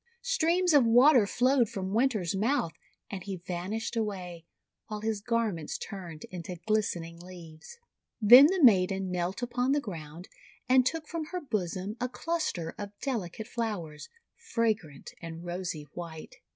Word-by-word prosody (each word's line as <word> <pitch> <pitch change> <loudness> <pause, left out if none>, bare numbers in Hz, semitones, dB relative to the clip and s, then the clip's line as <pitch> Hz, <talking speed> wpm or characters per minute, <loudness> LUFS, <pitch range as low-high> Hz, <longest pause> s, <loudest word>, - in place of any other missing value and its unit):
Streams 360 -7 +2
of 285 -3 +7
water 245 0 +6
flowed 250 0 +2
from 190 0 -4
Winter's 220 -7 +1
mouth, 215 - +1 0.4
and 195 -2 -5
he 195 0 -4
van 180 0 -5
ished 225 +2 -3
away, 185 -6 -4 0.4
while 210 -1 -5
his 220 -2 -2
garments 220 -8 -1
turned 175 -6 -8
into 180 0 -6
glistening 175 -6 -1
leaves. 175 - -12 0.4
Then 245 +6 +10
the 370 -1 0
maiden 190 -4 +4
knelt 180 +5 -2
upon 245 +2 0
the 290 - +2
ground, 170 - -8 0.4
and 255 0 +5
took 320 +2 -3
from 330 -2 -4
her 360 +4 -4
bosom 205 - -3
a 250 - 0
cluster 255 - -3
of 205 0 -7
delicate 220 - -4
flowers, 200 -11 -4 0.3
fragrant 215 - -2
and 165 0 -8
rosy 175 -3 -4
white. 165 -3 -8
205 Hz, 145 wpm, -29 LUFS, 175-245 Hz, 0.4 s, Then